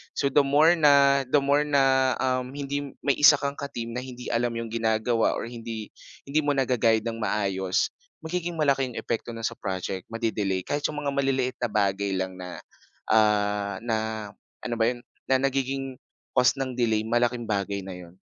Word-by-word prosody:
So 140 - 0
the 145 - +5
more 145 +4 +5
na, 140 -2 +5
the 140 +2 +3
more 145 +2 +2
na, 135 -2 +3
um, 130 0 -1
hindi 145 0 -3 0.2
may 140 - +2
isa 150 0 +8
kang 140 0 -4
ka 140 - -3
team 115 -4 -6
na 120 - -3
hindi 125 -1 -7
alam 120 +1 +1
yung 115 -1 -4
ginagawa 115 0 +1
or - - -4
hindi 115 -2 -7 0.3
hindi 140 +3 0
mo 145 -2 +1
naga-guide 120 -4 +2
ng 115 -1 -4
maayos, 95 -3 0 0.3
magiging 175 +1 -3
malaki 140 -4 +2
'yong 125 - -10
epekto 115 0 -4
no'n 115 - -7
sa - - -6
project, 95 -1 -4
ma-de-delay, 110 -5 -2
kahit 145 +8 -3
'yong 150 -1 -5
mga 140 - 0
maliliit 135 -2 0
na 120 - 0
bagay 100 -1 +1
lang 95 0 -3
na, 90 -1 -7 0.5
ah, 105 -2 +2
na 115 -2 0 0.7
ano 120 - -2
ba 115 - +4
'yon, 125 - -8 0.3
na 130 -1 +3
nagiging 135 0 -1 0.4
cause 125 0 +4
ng 135 -1 -2
delay 110 -3 +1
malaking 120 +1 +1
bagay 100 -1 -1
na 95 -1 -7
'yon. 90 0 -14
125 Hz, 185 wpm, -26 LUFS, 110-140 Hz, 0.7 s, isa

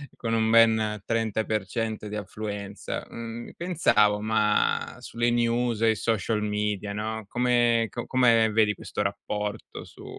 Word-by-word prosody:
con 115 -1 -3
un 110 -1 +2
ben 110 -2 +4
30% 110 -1 -2
di 105 - -6
affluenza, 100 0 -5
mhmm, 115 0 -7
pensavo, 105 - +2
ma 105 -1 +1
sulle 120 0 -1
news 120 -1 +1
e 115 - +4
i - - -1
social 110 0 0
media, 105 -1 -2
no, 110 +1 -4
come 120 -1 +2
co 120 - -5
come 115 -3 +4
vedi 105 -1 +3
questo 105 - -5
rapporto 105 +1 -4
su - - -14
110 Hz, 135 wpm, -26 LUFS, 105-115 Hz, -, ben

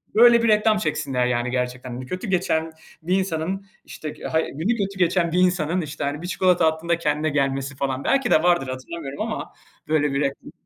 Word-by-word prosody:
böyle 235 +1 +7
bir - - +3
reklam 215 0 +4
çeksinler, 150 -8 -1
yani, 125 0 -1
gerçekten. 125 0 -3
Hani, 125 +2 -6
kötü 185 - -5
geçen 165 -3 0 0.3
bir 180 +3 +1
insanın, 185 +2 -2 0.2
işte, 155 - -7
g - - -11
ha 160 - +1
günü 175 - -2
kötü 195 -2 -3
geçen 175 -1 +2
bir 180 - +1
insanın, 180 -1 +2
işte, 155 -1 -5
hani, 145 +2 -2
1 175 - -5
çikolata 180 -2 +3
attığında 160 +2 0
kendine 150 -1 0
gelmesi 135 -1 -1
falan, 135 0 -2
belki 275 0 +1
de 155 - +5
vardır 175 -6 +3
hatırlamıyorum 135 +2 -6
ama - - -4 0.3
böyle 150 -2 +1
bir 140 - 0
reklam. 140 -1 -3
160 Hz, 195 wpm, -23 LUFS, 140-185 Hz, 0.3 s, böyle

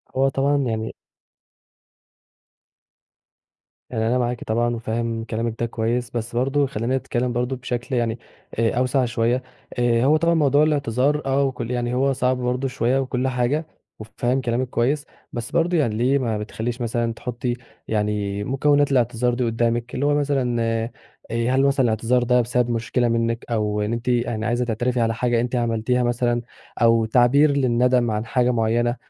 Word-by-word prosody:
هو 135 +1 +3
طبعًا 140 +2 +1
يعني 115 -5 -2 2.9
يعني 110 -2 -1
أنا 125 +2 +2
معاكِ 120 -1 -1
طبعًا، 120 +2 0
و 115 - -5
فاهم 115 0 -2
كلامِك 115 0 -3
ده 120 - +1
كويس، 115 +1 -2
بس 120 0 -4
برضه 135 +3 +1
خلّينا 125 +1 -1
نتكلِّم 125 -1 -2
برضه 125 +2 -1
بشكل 125 +1 -4
يعني 115 -1 -1 0.4
آآ 115 -1 +3
أوسع 130 +1 +2
شوية، 120 +2 0 0.4
آآ 120 0 +2
هو 155 +2 +5
طبعًا 170 +1 +2
موضوع 145 -2 +4
الاعتذار 145 -1 +1
آه، 135 +1 +2
وكُلّ 125 -3 -3
يعني 120 0 -1
هو 135 +2 +2
صعب 130 0 +1
برضه 125 +2 -1
شوية 125 +1 0
وكُلّ 130 -1 -1
حاجة، 130 +5 0 0.3
وفاهم 120 +4 -1
كلامِك 120 +1 -1
كويس، 135 +5 0 0.3
بس 120 -1 -5
برضه 170 +1 +2
يعني 120 -9 +1
ليه 125 +5 +2
ما 115 -5 -1
بتخلّيش 115 +3 -4
مثلًا 115 0 -1
تحُطي 120 0 -3 0.3
يعني 105 -1 -1
مكونات 145 +3 +2
الاعتذار 120 -1 +1
دي 125 +1 -1
قُدامِك، 115 +1 -1
اللي 140 - 0
هو 145 - +3
مثلًا 135 -5 0
آآ 115 +1 -1 0.6
هل 130 +1 +3
مثلًا 135 -1 +2
الاعتذار 120 +2 +1
ده 125 0 +3
بسبب 120 +1 0
مشكلة 120 +1 0
منِك، 115 0 0
أو 105 -2 0
إن 105 +3 -1
أنتِ 115 +2 -3
آآ 120 -2 0
عايزة 120 +1 0
تعترفي 120 +2 -1
على 115 0 +1
حاجة 120 0 +1
أنتِ 125 +1 -2
عملتيها 120 +1 0
مثلًا، 120 0 0 0.4
أو 115 -1 +4
تعبير 125 +6 +4
للندم 125 -3 +2
عن 105 +1 -2
حاجة 125 +1 +1
مُعيّنة، 120 +1 +1
120 Hz, 165 wpm, -22 LUFS, 115-130 Hz, 2.9 s, هو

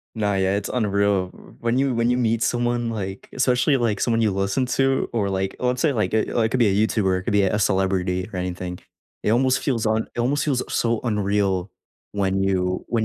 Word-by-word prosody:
Nah, 105 -2 0
yeah, 95 +1 +1
it's 105 - -3
unreal, 100 -5 +1
w - - -17
when 120 +2 0
you 135 -2 +1
when 115 +1 +1
you 125 - +2
meet 115 -2 +1
someone, 120 -1 0
like 95 -3 -5
especially, 130 +2 +2
like, 115 -5 0
someone 115 -1 +1
you 105 - +3
listen 100 +6 0
to, 135 0 +2
or, 105 -4 0
like, 95 0 -2
let's 125 0 0
say, 155 -3 +3
like, 105 -4 -1
eh, 110 - +3
like 110 -2 +1
could 130 - 0
be 115 - +4
a 95 - +1
YouTuber, 95 -4 0
it - - -9
could 115 - -1
be 100 -1 +4
a 95 +2 +1
celebrity 95 -2 0
or 90 - -4
anything. 90 0 -4 0.4
It - - +1
almost 130 +1 +2
feels 120 -5 0
un 110 +1 +1
it - - -10
almost 140 +4 +1
feels 135 -5 0
so 115 -1 +1
unreal 100 -3 0 0.4
when 95 -1 0
you 90 -1 0
when 115 -2 0
110 Hz, 220 wpm, -23 LUFS, 95-120 Hz, 0.4 s, be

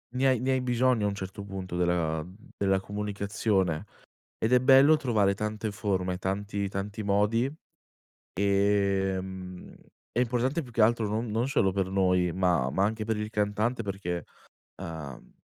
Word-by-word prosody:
ne 135 +1 +2
hai 130 -3 +3
ne 130 +3 0
hai 130 -1 +1
bisogno 125 -2 +2
a - - +3
un 100 - -4
certo 100 +1 -6
punto 95 -3 -6
della 85 -3 0 0.3
della 95 -1 +2
comunicazione 100 -3 -1 0.5
ed 110 - -1
è 125 - +6
bello 135 +4 +6
trovare 110 -8 +2
tante 105 +1 -3
forme, 95 -4 -1
tanti, 100 +1 -2
tanti 100 +3 -4
modi, 105 +5 +2 0.9
ehm, 95 -2 0 0.4
è 120 - 0
importante 125 +6 0
più 125 - -12
che 115 -1 +1
altro 110 0 +3
non 110 +3 -1
non 115 +5 0
solo 95 -8 +2
per 95 -1 0
noi 90 -2 +2
ma 90 -7 +1
ma 95 +7 +1
anche 110 +1 -1
per 110 0 -1
il 105 0 -4
cantante 105 +3 0
perché, 95 -5 -4 0.6
ehm, 75 -5 -8
100 Hz, 155 wpm, -28 LUFS, 95-115 Hz, 0.9 s, è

